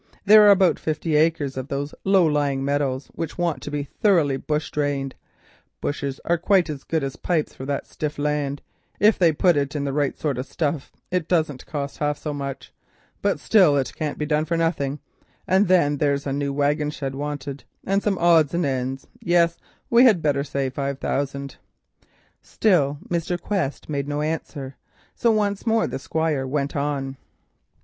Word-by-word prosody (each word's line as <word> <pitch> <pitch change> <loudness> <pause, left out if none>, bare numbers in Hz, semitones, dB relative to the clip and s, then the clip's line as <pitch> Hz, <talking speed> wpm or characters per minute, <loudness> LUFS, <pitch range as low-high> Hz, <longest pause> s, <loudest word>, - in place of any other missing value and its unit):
There 215 +1 +9
are - - +8
about 190 -3 +5
fifty 155 0 -1
acres 150 -3 +1
of 130 0 -4
those 140 0 -3
low 195 -2 +4
lying 145 -3 0
meadows 140 -1 -1
which 165 - -5
want 175 -3 -1
to - - -6
be 145 -1 -2
thoroughly 155 -2 +2
bush 150 +3 -2
drained—bushes 140 0 -5
are 170 0 +1
quite 180 -2 +3
as 140 -2 -7
good 160 -3 -1
as 135 +2 -4
pipes 165 -4 -1
for 130 - -8
that 140 -1 -2
stiff 150 -1 -5
land, 145 -1 -1 0.4
if 210 +1 +4
they 170 -3 +5
put 175 +3 +3 0.2
in 145 - -1
the 140 -1 -2
right 145 -1 0
sort 140 -5 -2
of 130 - -4
stuff, 150 -3 -2 0.2
and 180 0 +2
it 160 - -18
don't 155 -7 0
cost 140 -2 -5
half 150 -1 0
so 150 - -4
much—but 140 +7 -5
still 180 -10 +4
it 135 - -1
can't 150 -2 -3
be 150 - -2
done 150 0 +1
for 170 +1 -1
nothing, 150 -4 0 0.5
and 190 +2 +3
then 170 -6 +3
there 145 0 +2
is 140 - -6
a 135 - -1
new 140 0 -1
wagon 145 +1 +1
shed 135 -3 -4
wanted, 145 0 -5 0.2
and 195 +1 +1
some 200 -2 0
odds 170 -3 +4
and 175 - +1
ends; 130 0 -2
yes, 170 -1 +2 0.3
we 235 +1 +7
had 210 -9 +4
better 140 -2 +1
say 135 -2 -2
five 140 0 -3
thousand." 140 0 -3 0.8
Still 150 -9 +2
Mr. 175 +1 -1
Quest 175 -7 -2
made 140 -2 -2
no 145 +1 -2
answer, 150 -4 -4 0.4
so 235 - +1
once 210 0 0
more 225 0 +3
the - - -4
Squire 155 -2 -1
went 140 +3 -2
on. 140 -2 -2
150 Hz, 180 wpm, -23 LUFS, 140-170 Hz, 0.8 s, There